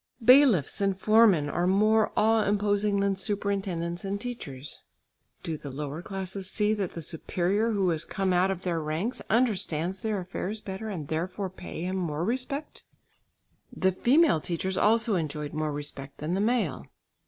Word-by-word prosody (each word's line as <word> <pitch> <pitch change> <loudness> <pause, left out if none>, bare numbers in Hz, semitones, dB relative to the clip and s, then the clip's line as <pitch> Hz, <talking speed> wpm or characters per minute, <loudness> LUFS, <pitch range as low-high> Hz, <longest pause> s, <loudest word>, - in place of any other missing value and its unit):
Bailiffs 250 - +6
and 195 -1 +1
foremen 210 -7 +5
are 175 +4 0
more 215 +3 +3
awe 220 0 +4
imposing 205 0 +1
than 200 -1 +1
superintendents 190 -4 -2
and 200 +1 -3
teachers. 150 - -6 0.6
Do 160 -2 -3
the 145 - -8
lower 145 +3 -5
classes 190 0 -4
see 210 0 +1
that 200 -4 -2
the 165 - -6
superior 185 +7 0
who 195 -3 +2
has 165 -1 0
come 190 +1 -1
out 180 +2 +3
of 190 -1 -3
their 170 -3 -1
ranks 160 +11 -2
understands 190 -7 0
their 215 0 -1
affairs 190 +3 -4
better, 205 +2 -6
and 165 -8 -5
therefore 180 +5 -3
pay 180 -2 -7
him 185 +1 -2
more 165 -3 -2
respect? 260 +6 -3 0.9
The 190 - +1
female 260 - +3
teachers 185 +3 -2
also 225 +2 +3
enjoyed 150 -4 -2
more 155 0 -1
respect 145 -1 -7
than 155 +4 -3
the 195 - +1
male. 215 - 0
190 Hz, 160 wpm, -28 LUFS, 165-210 Hz, 0.9 s, Bailiffs